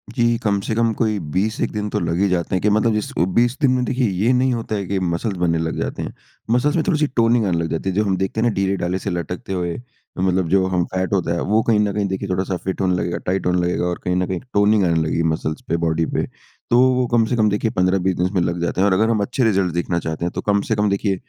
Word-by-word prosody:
जी, 120 -2 +2
कम 100 -2 +1
से 110 - -2
कम 115 0 +2
कोई 110 -3 +1
20-1 105 +6 -1
दिन 105 -1 -3
तो - - -1
लग 85 +1 -1
ही 100 - +3
जाते 90 0 -1
हैं, 95 - 0
कि 105 - +2
मतलब 110 +2 +2
जिस 105 0 -2
अ, - - +3
20 120 +7 +1
दिन 135 -3 +4
में 125 -1 +1
देखिए 125 -1 0
ये 100 +6 +1
नहीं 130 +1 +2
होता 115 -2 -3
है 100 -2 -3
कि 95 -1 -1
मसल्स 90 +3 -2
बनने 85 -2 +1
लग 80 0 -2
जाते - - -3
हैं। - - -6 0.4
मसल्स 130 +6 +2
में 160 - +2
थोड़ी-सी 155 -4 +2
टोनिंग 115 -1 +3
आने 90 -3 0
लग 85 0 -1
जाती 80 +4 -2
है। 95 - -3
जो 105 - +2
हम 95 -2 +1
देखते 95 +3 -2
हैं 120 - +3
ना 115 - +1
ढीले-ढाले 95 -1 0
से 100 - -4
लटकते 90 +2 -4
हुए, 85 -2 -2 0.4
मतलब 95 -1 +1
जो 95 -1 +3
हम 90 -2 +1
फैट 95 +1 -1
होता 85 -3 +1
है, 85 - -2
वो 110 +3 +2
कहीं 110 -2 +2
न 105 -1 +1
कहीं 105 0 0
देखिए 95 +1 -4
थोड़ा-सा 95 0 -1
फिट 95 +2 -4
होने 90 -1 +2
लगेगा, 90 -1 -2
टाइट 95 +1 -1
होने 90 0 +2
लगेगा। 90 0 0
और 90 0 -2
कहीं 90 - 0
न 90 0 0
कहीं 95 -2 -2
टोनिंग 105 0 +4
आने 85 -1 +2
लगी 80 - -1
है 85 - +1
मसल्स 80 0 -4
पे, 85 - +1
बॉडी 80 -1 0
पे। - - 0 0.4
तो 120 - +4 0.2
वो 125 0 +1
कम 120 -1 +3
से 120 - -1
कम 110 -2 +3
देखिए 105 +2 0
15-20 90 -1 +1
दिन 90 - 0
इसमें 95 0 0
लग 85 0 -1
जाते 85 +2 -1
हैं। 100 - +4
और 95 - +3
अगर 110 +4 +2
हम 115 - +1
अच्छे 125 +5 -1
रिज़ल्ट 95 -6 +2
देखना 85 0 -1
चाहते 80 +1 -4
हैं, 85 - -1
तो - - -2
कम 100 -1 +1
से 110 - +2
कम 105 0 +1
देखिए 100 0 0
95 Hz, 290 wpm, -20 LUFS, 90-110 Hz, 0.4 s, दिन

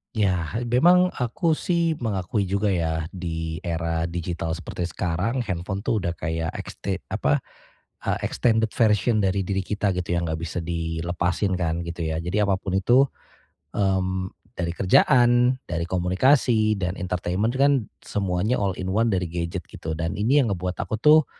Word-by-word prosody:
Iya, 95 -1 0
memang 175 +9 +5
aku 155 +6 0
sih 170 -2 +1
mengakui 100 0 -1
juga 100 +2 0
ya. 80 -4 0
Di 80 -1 -4
era 85 -1 -1
digital 85 -1 -3
seperti 85 +1 -4
sekarang 90 +11 -1
handphone 95 -3 -3
tuh 105 -1 -1
udah 85 - 0
kayak 80 0 -3
exte 95 -1 -5
apa 70 +1 +1 0.6
e - - -7 0.2
extended 115 -2 +2
version 110 -2 +3
dari 95 0 0
diri 95 0 0
kita 100 -1 -1
gitu 90 -1 -3
yang 85 - -1
enggak 80 0 -3
bisa 85 +2 -4
dilepasin 85 +3 -1
kan, 85 -1 -1
gitu 85 0 -5
ya. 80 - -1
Jadi 85 +3 -4
apapun 95 -1 0
itu 120 +8 +4 0.7
mmm, 95 -2 0 0.2
dari 85 -1 -3
kerjaan, 120 +5 +4
dari 85 -1 -3
komunikasi 110 +5 +3
dan 90 -2 -1
entertainment 90 +6 -1
kan 135 -5 +3 0.2
semuanya 100 +4 0
all 95 -3 0
in 95 0 -3
one 115 +3 +2
dari 95 -4 +1
gadget 85 0 -3
gitu. 80 -1 -6
Dan 80 0 -2
ini 135 +6 +4
yang 110 - 0
ngebuat 90 -1 -3
aku 110 0 -3
tuh, 155 +2 +7
95 Hz, 155 wpm, -24 LUFS, 85-110 Hz, 0.7 s, tuh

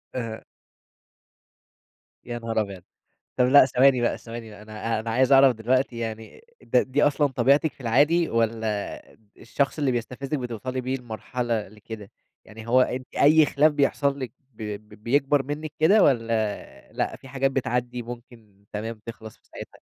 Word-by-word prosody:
أها. 115 -3 -5 1.8
يا 120 0 -5
نهار 115 -1 -1
ابيض! 100 -4 -7 0.5
طَب 125 - +4
لأ 140 +2 +8
ثواني 130 0 +4
بقى، 120 - 0
ثواني 115 -1 -9
بقي، 105 0 -12
أنا 110 +1 -3
أنا 115 +1 -5
عايز 130 +4 +2
أعرف 135 -1 +7
دلوقتي 125 +2 0
يعني 115 - -6 0.2
ده 125 - +2
دي 135 +3 -1
أصلًا 145 0 +3
طبيعتِك 140 +4 +2
في - - -29
العادي، 145 +8 +3
والّا 110 -2 -1 0.3
الشخص 140 +6 -2
اللي 140 -3 +1
بيستفزِّك 125 +5 -3
بتوصلي 125 +1 -4
بيه 130 +1 -2
لمرحلة 120 -2 -4
لكده؟ 105 0 -10 0.3
يعني 110 +1 -12
هو 125 +2 +5
أنتِ 130 0 -2
أي 155 +2 +6
خلاف 150 +2 +3
بيحصل 140 -1 +1
لِك 130 -4 -5 0.2
ب 110 - -10 0.4
بيكبر 140 +3 +2
منِك 145 +2 -5
كده، 190 +7 +5
والّا 115 -5 -1
لأ - - -2
في 135 - -15
حاجات 135 +1 0
بتعدّي 125 -2 -2
ممكن 115 -4 -12
تمام 110 +1 -5
تخلص 110 -1 -9
في - - -39
ساعتها؟ - - -11
125 Hz, 155 wpm, -25 LUFS, 115-135 Hz, 1.8 s, لأ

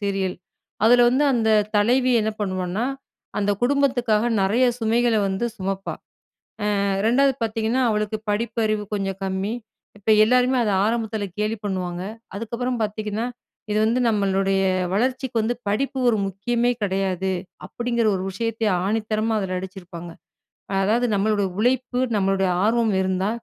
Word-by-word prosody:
Serial. 195 -2 -1 0.5
அதில 245 +1 +6
வந்து, 275 +4 +2
அந்த 225 -2 +2 0.3
தலைவி 250 +5 +3
என்ன 220 - 0
பண்ணுவான்னா, 185 +2 -2 0.5
அந்த 205 0 +1
குடும்பத்துக்காக 245 -5 +2 0.2
நிறைய 220 +7 +3 0.2
சுமைகள 230 +1 +2
வந்து 190 +5 -2
சுமப்பா. 195 0 -3 0.9
அ - - +1 0.2
2வது 270 +4 +4
பார்த்தீங்கன்னா, 225 +3 0
அவளுக்கு 210 0 -1
படிப்பறிவு 215 -1 0
கொஞ்சம் 195 -1 -2
கம்மி. 190 +2 -2 0.5
இப்ப 210 +2 -1
எல்லாருமே 250 +2 +3
அத 210 - +1 0.2
ஆரம்பத்தில 220 -2 -1
கேலி 215 +2 0
பண்ணுவாங்க. 180 -3 -3 0.3
அதுக்கப்புறம் 235 +4 -3
பார்த்தீங்கன்னா 215 +1 -2 0.5
இது 210 - +1
வந்து 235 +3 +2
நம்மளுடைய, 195 -2 +1 0.3
வளர்ச்சிக்கு 255 +3 -1
வந்து 225 +3 0
படிப்பு 265 +6 -1
ஒரு 230 - +3
முக்கியமே 235 +6 0
கிடையாது. 190 -1 0 0.4
அப்படிங்கிற 235 +2 -1
ஒரு 185 - -4
விஷயத்தை 225 +3 -2 0.2
ஆணித்தரமா 215 +1 0
அதுல 185 -2 -2
அடிச்சிருப்பாங்க. 180 -2 -8 0.7
அதாவது 230 +5 +2
நம்மளோட 205 0 +1 0.2
உழைப்பு, 250 +1 +1 0.2
நம்மளுடைய 195 -1 +1
ஆர்வம் 225 +1 +2
இருந்தா, 190 +1 0
215 Hz, 125 wpm, -23 LUFS, 195-235 Hz, 0.9 s, அதில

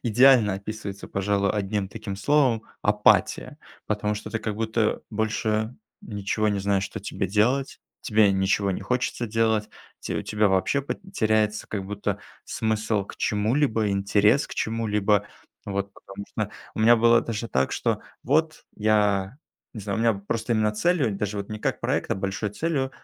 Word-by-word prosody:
идеально 120 -3 +5
описывается 100 0 -6
пожалуй 100 0 0
1 100 -1 -1 0.3
словом- 130 -1 +2 0.2
апатия. 105 0 +2 0.3
Потому 105 0 -1
что 105 +1 -7
ты 115 - -1
как 110 -1 -3
будто 110 0 0
больше 110 +1 -1 0.3
ничего 105 +1 -1
не 100 -1 0
знаешь 100 0 +1
что 110 - -6
тебе 95 - -3
делать, 120 +8 +1 0.2
тебе 105 -2 +4
ничего 95 +1 +1
не 95 - -3
хочется 125 -1 -1
делать, 110 -1 +1 0.3
те - - -4
у - - -2
тебя 105 -1 +1
вообще 95 +9 +1 0.3
теряется 110 - +1 0.8
смысл 110 -2 -1
к - - -11
чему-либо, 110 +1 +1
интерес 100 +6 +3
к - - -9
чему-либо. 105 -2 +1 0.4
Вот, 100 0 -3
потому 100 +1 -10
что, 110 -1 -3 0.2
у - - -8
меня 115 +2 +7
было 115 +1 +5
даже 115 0 -4
так, 65 +1 0
что - - 0 0.2
вот 155 +4 +1
я 105 0 +2 0.4
не 110 - -6
знаю, 100 +2 -3
у - - 0
меня 115 -1 +3
просто 110 +4 -2 0.2
целью, 140 - +1
даже 105 -1 -3
не 110 - -5
как - - -2
проект, - - -1
а - - +2
большой 100 +2 -3
целью 135 +2 -1
105 Hz, 150 wpm, -25 LUFS, 100-115 Hz, 0.8 s, меня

